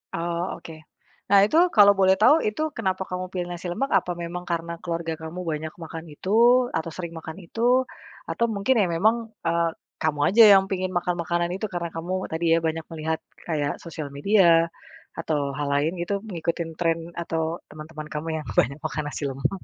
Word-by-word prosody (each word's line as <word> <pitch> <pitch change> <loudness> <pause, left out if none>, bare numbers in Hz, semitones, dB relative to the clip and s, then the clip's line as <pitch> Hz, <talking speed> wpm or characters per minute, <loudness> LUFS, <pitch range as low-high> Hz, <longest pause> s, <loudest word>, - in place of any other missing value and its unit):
Oh 170 +1 -2
oke, - - -11 0.6
nah 200 0 +7
itu 305 - +1 0.2
kalau 205 -2 +8
boleh 190 0 +5
tahu 290 - +7
itu 215 +8 -2 0.2
kenapa 190 -4 -1
kamu 185 0 -3
pilih 180 -2 -3
nasi 175 +1 -6
lemak? 260 +11 -2
Apa 180 - -5
memang 175 +1 -5
karena 170 0 -2
keluarga 165 -2 -3
kamu 160 +3 -6
banyak 155 +1 -4
makan 165 0 -7
itu 185 - -7 0.5
atau 160 +1 -4
sering 170 -2 -5
makan 160 0 -8
itu, 170 - -10 0.7
atau 235 - +1
mungkin 200 +6 +2
ya 185 - +2
memang, 215 +7 +4 0.3
eee, 170 0 +2 0.3
kamu 155 -2 0
aja 225 +4 +7
yang 195 -1 +6
pingin 185 -1 -1
makan 175 0 -1
makanan 170 +1 0
itu? 195 - -3
Karena 170 -1 -2
kamu 165 +2 -5 0.2
tadi 160 +1 -2
ya - - +3
banyak 160 0 -3
melihat 160 0 -2 0.3
kayak 150 -4 0
sosial 155 -3 -6
media, 170 0 +4 0.5
atau 160 -2 -1 0.2
hal 145 -1 -2
lain 145 +3 +2
gitu 175 +4 -2 0.2
ngikutin 170 0 -2
tren 165 -1 +2 0.2
atau 165 -1 -2 0.3
teman-teman 155 0 -9
kamu 150 +2 -4
yang 155 - -8
banyak 140 +5 +1
makan 155 - -2
nasi - - -5
lemak. 135 0 -1
170 Hz, 185 wpm, -25 LUFS, 160-185 Hz, 0.7 s, kalau